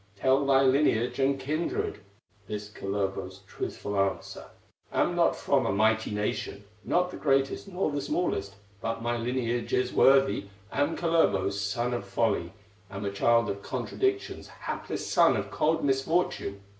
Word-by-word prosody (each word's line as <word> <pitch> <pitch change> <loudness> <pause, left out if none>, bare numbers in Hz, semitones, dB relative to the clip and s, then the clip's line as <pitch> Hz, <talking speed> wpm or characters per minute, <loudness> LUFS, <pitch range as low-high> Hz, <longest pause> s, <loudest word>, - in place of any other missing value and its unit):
Tell 130 +7 +2
thy 135 -1 +5
lineage 130 -3 +2
and 135 0 +2
kindred." 155 +1 -2 0.5
This, 105 0 -5
Kullervo's 95 -2 -3
truthful 100 +2 -5
answer: 95 0 -2 0.5
"Am - - +1
not - - +3
from - - +1
a - - +1
mighty 110 +2 +2
nation, 105 -1 -3 0.2
Not 180 0 +1
the - - -7
greatest, 135 +4 +1
nor 180 -4 -1
the 145 0 -2
smallest, 100 - -2 0.3
But 115 0 -3
my 120 0 0
lineage 120 0 -2
is 125 0 +1
worthy: 135 -7 +4 0.2
Am 145 +3 0
Kalervo's 100 - +2
son 120 +4 -1
of 120 - -2
folly, 110 -6 0 0.4
Am 100 +1 -6
a 100 - -1
child 115 +3 +3
of 100 0 -4
contradictions, 390 - -2
Hapless - - -5
son - - +4
of - - -4
cold 160 +1 +1
misfortune. 135 - 0
120 Hz, 145 wpm, -28 LUFS, 100-140 Hz, 0.5 s, thy